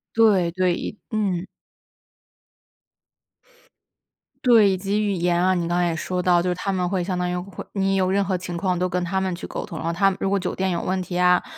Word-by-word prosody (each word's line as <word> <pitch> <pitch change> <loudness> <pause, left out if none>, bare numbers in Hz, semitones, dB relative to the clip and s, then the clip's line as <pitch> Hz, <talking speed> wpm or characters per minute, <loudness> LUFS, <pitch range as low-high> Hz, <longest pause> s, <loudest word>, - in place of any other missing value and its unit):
对 200 -7 +4
对， 180 0 +1
以 210 - -5
嗯。 195 -5 -1 3.0
对， 230 -5 +6
以 190 - 0
及 200 +3 -1
语 205 - 0
言 175 -2 +1
啊， 185 0 +3
你 175 -2 -1
刚 175 +1 0
才 175 - +2
也 165 - -2
说 180 +3 -2
到， 175 -1 +4
就 180 - -2
是 180 - 0
他 195 +3 -2
们 180 -2 -1
会 185 -2 -1
相 180 0 -2
当 180 0 -1
于 180 - -2
会 180 +2 -7
你 195 -1 +1
有 185 -1 +2
任 200 +1 +2
何 190 -1 -1
情 180 -1 -6
况 180 0 -1
都 180 - +1
跟 180 0 -1
他 185 +2 -1
们 190 -2 -1
去 175 - -8
沟 - - -5
通。 165 - -8
然 160 - -5
后 165 - 0
他 195 +3 +3
们 190 - -4
如 195 - +1
果 200 0 +1
酒 180 - -3
店 190 0 0
有 170 - -1
问 185 +1 -1
题 180 0 -4
啊， 180 0 +4
185 Hz, 260 characters per minute, -23 LUFS, 175-195 Hz, 3.0 s, 对